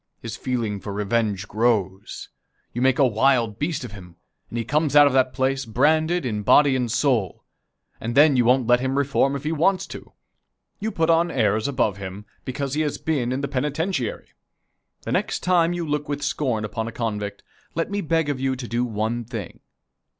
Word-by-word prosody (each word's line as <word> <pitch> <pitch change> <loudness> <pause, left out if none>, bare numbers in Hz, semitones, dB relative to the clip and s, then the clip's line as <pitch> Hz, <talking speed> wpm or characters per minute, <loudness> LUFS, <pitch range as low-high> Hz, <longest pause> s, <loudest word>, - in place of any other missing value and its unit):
His 115 -2 -6
feeling 115 -5 -2
for 100 - -7
revenge 105 -1 -1
grows. 105 -3 -1 0.4
You 120 - -3
make 130 0 +3
a 140 - +5
wild 115 -2 +2
beast 150 0 -2
of 125 - -7
him, 90 -4 -12 0.3
and 120 - -5
he 115 - -2
comes 150 +2 0
out 145 0 +9
of 140 - +2
that 130 -1 +3
place 135 +1 0
branded 155 +7 +2
in 105 -4 -2
body 140 +6 +5
and 125 -3 -1
soul, 120 - 0 0.6
and 115 +1 -4
then 145 0 +6
you 125 - +4
won't 125 +1 +3
let 120 +1 +4
him 130 +2 -1
reform 140 0 +2
if 140 - -5
he 155 - -1
wants 180 +4 +2
to. - - -11 0.7
You 220 +1 -2
put 165 -5 +1
on 165 +1 +3
airs 110 -5 +1
above 110 -8 0
him, 100 +1 -7 0.2
because 135 +1 -3
he 155 - 0
has 150 -2 -1
been 135 -6 -1
in 130 +2 -2
the 140 - -2
penitentiary. 145 - -2 0.7
The - - -4
next - - -1
time 175 -2 +3
you 175 -2 -3
look 150 0 -2
with 145 0 -3
scorn 125 -6 -1
upon 110 +1 -4
a - - -5
convict, 105 -4 -4 0.3
let 165 +4 -1
me 205 0 -1
beg 165 -2 0
of 145 -3 -2
you 135 0 0
to 125 -1 -7
do 120 +1 -1
one 115 +1 -2
thing. 110 -5 -7
130 Hz, 200 wpm, -23 LUFS, 110-145 Hz, 0.7 s, out